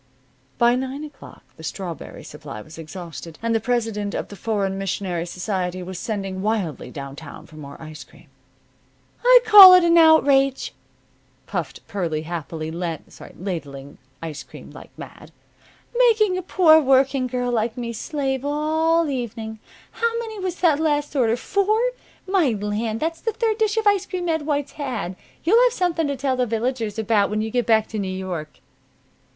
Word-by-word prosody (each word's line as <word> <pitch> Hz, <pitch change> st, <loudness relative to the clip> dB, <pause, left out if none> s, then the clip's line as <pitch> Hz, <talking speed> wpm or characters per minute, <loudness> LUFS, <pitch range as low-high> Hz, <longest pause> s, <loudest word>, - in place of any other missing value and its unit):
By 240 Hz, 0 st, +4 dB
nine 265 Hz, +3 st, -3 dB
o'clock 295 Hz, -2 st, -12 dB
the 160 Hz, -, -12 dB
strawberry 170 Hz, 0 st, -6 dB
supply 150 Hz, -6 st, -9 dB
was 155 Hz, +1 st, -13 dB
exhausted, 165 Hz, -1 st, -9 dB
and 230 Hz, 0 st, +1 dB
the 225 Hz, -, +2 dB
president 220 Hz, -3 st, -2 dB
of -, -, -4 dB
the 205 Hz, -, -9 dB
Foreign 200 Hz, -1 st, -1 dB
Missionary 185 Hz, -3 st, -3 dB
Society 185 Hz, -1 st, -3 dB
was 185 Hz, 0 st, -7 dB
sending 195 Hz, -4 st, -4 dB
wildly 195 Hz, -, -2 dB
down 140 Hz, +1 st, -8 dB
town 150 Hz, -1 st, -11 dB
for 155 Hz, -, -17 dB
more 140 Hz, -2 st, -10 dB
ice 155 Hz, -1 st, -9 dB
cream. -, -, -20 dB, 1.0 s
"I -, -, +8 dB
call 395 Hz, -4 st, +11 dB
it 365 Hz, -, +5 dB
an 340 Hz, 0 st, +5 dB
outrage," 275 Hz, -4 st, +4 dB, 0.7 s
puffed -, -, -5 dB
Pearlie 165 Hz, -6 st, -2 dB
happily, 160 Hz, -1 st, -5 dB
ladling 165 Hz, -3 st, -7 dB, 0.2 s
ice 155 Hz, -3 st, -5 dB
cream -, -, -13 dB
like -, -, -12 dB
mad. -, -, -11 dB, 0.6 s
"Making 450 Hz, -6 st, +4 dB
a 370 Hz, -, -2 dB
poor 335 Hz, -3 st, +5 dB
working 265 Hz, -1 st, +3 dB
girl 245 Hz, 0 st, -2 dB
like 230 Hz, 0 st, -1 dB
me 235 Hz, -1 st, -4 dB
slave 270 Hz, +1 st, -3 dB
all 315 Hz, +3 st, +1 dB
evening! 225 Hz, -5 st, -5 dB, 0.3 s
How 465 Hz, 0 st, -1 dB
many 445 Hz, -3 st, -5 dB
was 370 Hz, -1 st, -4 dB
that 320 Hz, -5 st, +4 dB
last 295 Hz, -2 st, 0 dB
order? 235 Hz, -3 st, +2 dB
Four? 400 Hz, -, +1 dB, 0.5 s
My 365 Hz, -, +2 dB
land! 215 Hz, +2 st, -2 dB
that's 330 Hz, +1 st, -2 dB
the 450 Hz, -, -2 dB
third 450 Hz, 0 st, -1 dB
dish 435 Hz, -1 st, +1 dB
of 445 Hz, -, +1 dB
ice 405 Hz, -2 st, +3 dB
cream 360 Hz, -2 st, -4 dB
Ed 320 Hz, -2 st, -1 dB
White's 290 Hz, -2 st, -1 dB
had! 235 Hz, -11 st, -4 dB, 0.3 s
You'll 440 Hz, +9 st, +5 dB
have -, -, +2 dB
something 340 Hz, -6 st, 0 dB
to 280 Hz, -, -2 dB
tell 265 Hz, 0 st, 0 dB
the 250 Hz, -1 st, +1 dB
villagers 225 Hz, -1 st, -2 dB
about 215 Hz, -2 st, +2 dB
when 215 Hz, +1 st, -1 dB
you 220 Hz, -, -4 dB
get 245 Hz, 0 st, 0 dB
back 220 Hz, -1 st, +4 dB
to 220 Hz, -, -4 dB
New 195 Hz, -2 st, -2 dB
York." 185 Hz, -5 st, -6 dB
235 Hz, 170 wpm, -22 LUFS, -, 1.0 s, call